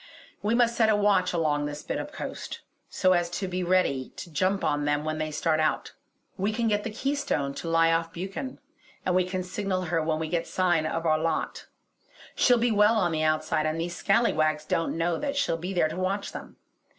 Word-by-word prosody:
We 215 +3 +1
must 235 -1 +3
set 225 -2 +3
a 215 - +4
watch 205 -3 +3
along 150 -4 0
this 145 0 -6
bit - - -3
of - - -6
coast, - - -6 0.3
so 185 0 +3
as 175 -1 +1
to 190 +2 -3
be 185 0 -2
ready 175 -8 +1
to 175 - -8
jump 190 +5 0
on 145 -1 +1
them 145 0 +1
when 155 0 -2
they 155 0 -1
start 155 +1 0
out. 155 - 0 0.5
We 200 +3 +1
can 230 +1 0
get 205 -1 +1
the - - -3
Keystone 250 - -1
to 165 - -5
lie 165 0 +4
off 165 0 0
Buchan; 195 +9 -5 0.5
and 185 - +1
we 185 0 +3
can 185 0 -3
signal 185 0 -2
her 165 -1 0
when 155 0 0
we 160 0 -3
get 170 +1 -1
sign 175 -4 +1
of 165 +1 -3
our 155 -1 +3
lot. 165 +1 -2 0.7
She'll 245 -1 +4
be 235 0 +2
well 210 +1 +4
on 180 -6 +2
the 155 -1 -1
outside, 155 0 +1
and 155 +1 -2
these 175 +1 -3
scallywags 155 -9 +2
don't 165 - -1
know 170 0 0
that 285 -1 -2
she'll 280 -11 +1
be 175 +3 -5
there 175 -4 +2
to 160 - -6
watch 195 +2 -1
them. - - -9
175 Hz, 220 wpm, -27 LUFS, 155-200 Hz, 0.7 s, a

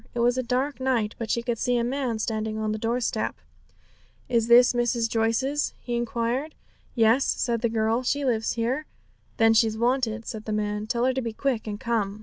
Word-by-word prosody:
It - - -2
was 240 +1 +3
a 255 - 0
dark 255 +4 -1
night, 245 -5 0
but 230 -2 -4
she 235 +1 0
could 235 -2 -2
see 245 0 +1
a 235 - +1
man 250 -2 -1
standing 220 0 -2
on 215 0 -1
the 215 - -3
doorstep. 235 +2 -1 0.9
'Is 230 -2 +2
this 245 +1 +7
Mrs. 240 -1 +1
Joyce's?' 230 +6 0
he 240 - -4
inquired. 240 +5 -2 0.4
'Yes,' 230 +3 +4
said 235 -3 0
the 235 - +1
girl; 225 +1 +1
'she 280 +3 -1
lives 225 -3 0
here.' 250 +6 -2 0.5
'Then 225 0 +5
she's 220 -1 +3
wanted,' 235 -2 0
said 220 -1 -6
the 215 - -3
man; 210 0 -2
'tell 235 +2 0
her 260 - +2
to 260 - -1
be 230 -2 -4
quick 245 -2 -1
and 205 -1 -4
come.' 215 -4 -1
235 Hz, 200 wpm, -25 LUFS, 220-250 Hz, 0.9 s, this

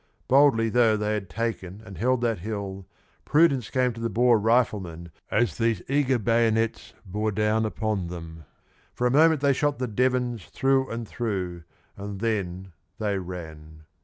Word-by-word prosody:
Boldly 130 -5 +4
though 115 -2 +3
they 105 0 -1
had 100 -3 -4
taken 110 -3 -4
and 100 -3 -10
held 125 +3 +1
that 115 -4 0
hill, 100 -1 -5 0.4
prudence 140 -7 +3
came 125 -2 +1
to 115 - -9
the 115 - -1
Boer 120 +2 +4
riflemen 100 -7 0 0.2
as 105 -8 0
these 115 -5 +1
eager 135 -2 +2
bayonets 115 0 +1
bore 105 +3 -2
down 110 +1 +1
upon 105 -4 -2
them. 80 -2 -9 0.5
For 125 - -1
a 125 - +3
moment 155 +1 +4
they 140 -1 +4
shot 145 +2 0
the 130 - -2
Devons 125 -1 0
through 135 0 +1
and 115 -1 -5
through, 90 -8 -4 0.3
and 100 -1 -7
then 95 -5 -3 0.2
they 105 -3 -1
ran. 80 -4 -9
110 Hz, 160 wpm, -26 LUFS, 95-125 Hz, 0.5 s, Boldly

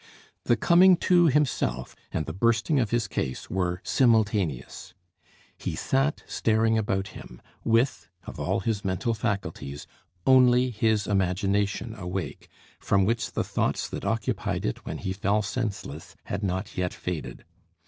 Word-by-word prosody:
The 120 - +4
coming 180 - +6
to 175 -1 +4
himself 135 - 0 0.2
and 80 - -2
the 80 - -5
bursting 115 - +2
of 115 -5 +1
his 120 -1 0
case 65 -9 -4
were 90 -1 -1
simultaneous. 105 - +1 0.6
He - - -3
sat 135 +3 0
staring 110 0 +1
about 100 -3 -1
him, - - -11 0.2
with, 115 +3 +1 0.2
of - - -8
all - - 0
his 105 0 -1
mental 95 +5 -1
faculties, 100 - -3 0.4
only 125 -1 +5
his 110 -2 +1
imagination 100 +3 0
awake, 95 -3 -5 0.3
from 95 -1 +2
which 110 -4 -1
the - - 0
thoughts - - -1
that - - -6
occupied - - -1
it - - -4
when - - -4
he 95 - -3
fell 100 +2 +1
senseless 100 - -4
had 95 - -4
not 95 +1 -3
yet 90 -1 -2
faded. 75 -9 -5
105 Hz, 140 wpm, -26 LUFS, 95-120 Hz, 0.6 s, coming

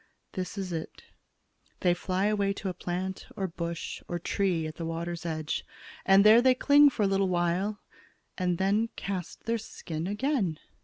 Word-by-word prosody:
This 185 +2 -5
is 190 -3 -3
it: 160 -1 -6 0.8
They 180 -1 +4
fly 185 +2 -1
away 205 -2 +1
to 200 -1 -4
a - - -3
plant 185 +2 -4
or 195 -3 -2
bush 170 -1 -5
or 175 - -2
tree 175 -1 0
at 155 0 -6
the 170 - -4
water's 170 +1 -4
edge, 155 -1 -2 0.4
and 195 +1 +7
there 220 +3 +8
they 255 0 +5
cling 285 +2 +6
for 235 -5 -1
a - - +4
little 195 -1 +2
while 180 +4 0 0.6
and 180 -2 0
then 205 +5 +2
cast 190 -4 -5
their 230 0 0
skin 165 -6 -6
again." 210 - 0
190 Hz, 170 wpm, -29 LUFS, 170-205 Hz, 0.8 s, there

